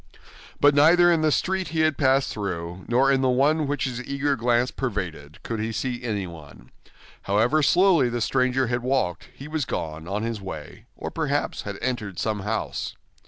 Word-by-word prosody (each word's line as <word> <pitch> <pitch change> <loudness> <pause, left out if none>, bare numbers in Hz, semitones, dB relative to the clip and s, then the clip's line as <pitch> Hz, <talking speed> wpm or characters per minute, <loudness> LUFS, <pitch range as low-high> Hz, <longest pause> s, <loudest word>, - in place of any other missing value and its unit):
But 145 0 +6
neither 170 +5 +6
in 165 -2 +2
the 155 -1 +3
street 190 +4 0
he 160 +1 -1
had 155 -1 +2
passed 135 -1 +2
through, 90 -3 -5
nor 130 +3 +3
in 135 -1 +2
the 130 - +2
one 145 +4 +2
which 145 -1 -1
his 125 -2 -3
eager 140 +1 0
glance 120 +1 +1
pervaded, 85 - -4
could 115 -1 -4
he 110 +1 -2
see 120 +2 -3
anyone; 85 - -6 0.6
however 120 +10 +3
slowly 175 -4 +4
the 120 0 -2
stranger 130 +2 +1
had 120 0 -1
walked, 125 -10 -1
he 140 - -10
was 155 -1 -2
gone 80 -8 -4
on 100 +3 -2
his 115 -2 -3
way, 80 -6 -8
or - - -5
perhaps - - -1
had - - -5
entered 110 -8 -3
some 110 -2 -1
house. 105 +3 -3
125 Hz, 180 wpm, -24 LUFS, 105-140 Hz, 0.6 s, But